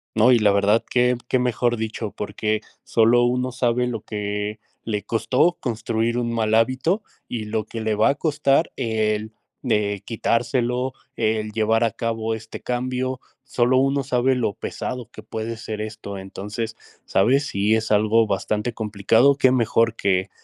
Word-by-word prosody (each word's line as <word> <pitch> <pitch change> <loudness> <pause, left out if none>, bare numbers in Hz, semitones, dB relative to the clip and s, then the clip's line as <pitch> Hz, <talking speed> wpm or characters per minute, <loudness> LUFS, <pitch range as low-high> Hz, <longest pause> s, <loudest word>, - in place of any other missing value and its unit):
No 110 +3 +5
y 120 - +6
la 105 -2 +4
verdad 100 +3 +3
que 125 0 +2
que 130 - +2
mejor 120 -1 +1
dicho, 110 -1 -3
porque 105 +1 -2 0.2
solo 115 +2 +4
uno 125 +1 0
sabe 125 0 +1
lo 115 -3 -3
que 105 0 -4 0.2
le 105 -2 -2
costó 115 +10 +2
construir 115 0 -1
un 120 -1 -1
mal 110 -1 0
hábito 130 - +2 0.3
y 115 -3 -4
lo 110 0 -2
que 115 +1 -7
le 110 -1 0
va 110 +6 +4
a - - +1
costar 150 -1 +2
el 110 -3 -1 0.3
de 100 -2 0
quitárselo, 120 +2 0 0.2
el 110 0 0
llevar 110 +1 +2
a 115 - +1
cabo 115 0 -2
este 110 0 -8
cambio, 130 +1 -2 0.2
solo 130 -1 +2
uno 135 +1 +2
sabe 130 0 +1
lo 120 -5 0
pesado 125 -2 -5
que 110 - -10
puede 110 +1 -5
ser 110 -1 -6
esto, 110 -2 -6
entonces, 105 +4 -5 0.3
sabes, 135 +9 +3
si 105 0 +1
es 110 0 -2
algo 110 +2 +4
bastante 105 +3 -1
complicado, 110 +5 +3
que 130 -1 +5
mejor 115 -2 +2
que 95 -3 0
115 Hz, 160 wpm, -23 LUFS, 110-125 Hz, 0.3 s, y